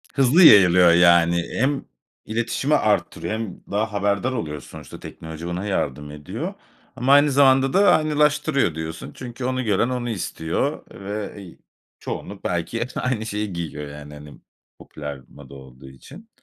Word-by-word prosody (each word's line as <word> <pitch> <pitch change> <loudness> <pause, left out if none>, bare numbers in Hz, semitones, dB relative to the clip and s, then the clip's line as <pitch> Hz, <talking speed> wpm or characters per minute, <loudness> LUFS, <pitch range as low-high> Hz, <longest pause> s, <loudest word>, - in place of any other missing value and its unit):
Hızlı 140 +6 +5
yayılıyor, 90 - +7
yani, 85 0 +4 0.2
hem 135 +2 0 0.4
iletişimi 120 +6 0
arttırıyor 105 -3 0
hem 110 -4 -5
daha 105 +1 -1
haberdar 100 +5 0
oluyoruz. 75 - -5
Sonuçta - - -11
teknoloji 80 +1 -9
ona 90 +3 -4
yardım 75 -7 -3
ediyor. 75 -1 -6 0.4
Ama 130 +3 +2
aynı 145 0 +5
zamanda 135 -1 +4
da 200 0 +5
aynılaştırıyor 150 - +1
diyorsun 80 0 -6
çünkü 125 0 -7
onu 130 0 -1
gören 110 +2 +1
onu 125 -1 -3
istiyor 85 -6 -3
ve, 100 +2 -6
iii, 90 -4 -13 0.4
çoğunluk 100 -1 -7
belki 90 +7 -2
hep 125 - -3
aynı 125 -4 -2
şeyi 105 -2 -4
giyiyor. 80 -4 -5
Yani, 75 0 -10
hani, 75 0 -11 0.4
popüler 75 -2 -8
moda 70 -1 -15
olduğu 65 -1 -13
için. 150 - -15
100 Hz, 145 wpm, -22 LUFS, 80-130 Hz, 0.4 s, yayılıyor